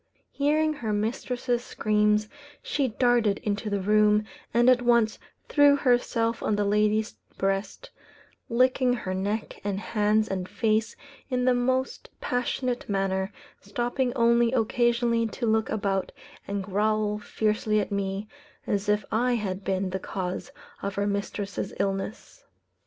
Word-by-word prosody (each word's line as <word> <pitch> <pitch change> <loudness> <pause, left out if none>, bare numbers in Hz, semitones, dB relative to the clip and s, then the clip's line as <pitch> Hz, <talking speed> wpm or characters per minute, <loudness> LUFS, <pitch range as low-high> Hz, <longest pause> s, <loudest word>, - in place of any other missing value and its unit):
Hearing 305 +2 +2
her 235 -7 -4
mistress's 240 +3 -1
screams, 210 -2 +1 0.4
she 280 -3 0
darted 235 -3 +2
into 210 +1 -2
the 200 -1 0
room, 210 +1 +4 0.3
and 240 +2 +3
at 255 -1 +6
once 235 -2 +3 0.3
threw 290 -1 +5
herself 240 -4 +1
on 215 - +1
the 205 0 0
lady's 210 +2 +1 0.2
breast, 195 - -2 0.6
licking 255 +1 +3
her 190 -6 -3
neck 205 +4 -3
and 200 -1 -2
hands 215 0 +1
and 185 -1 -3
face 220 -1 0 0.3
in 250 -1 0
the 255 - +5
most 255 +2 -1
passionate 250 0 -2
manner, 195 0 0 0.3
stopping 245 +5 -1
only 235 -1 +4
occasionally 235 0 +2
to 235 +3 -4
look 220 0 +1
about 195 -3 -1 0.4
and 200 0 -2
growl 210 +1 0
fiercely 215 0 0
at 205 - -3
me, 200 +1 -2 0.4
as 205 0 -1
if 210 -1 +2
I 245 +3 +2
had 195 -3 -3
been 190 -1 -1
the 190 - -2
cause 185 +8 -4 0.3
of 200 -1 -3
her 200 - 0
mistress's 200 -1 -3
illness. 195 +2 -3
215 Hz, 135 wpm, -26 LUFS, 200-240 Hz, 0.6 s, at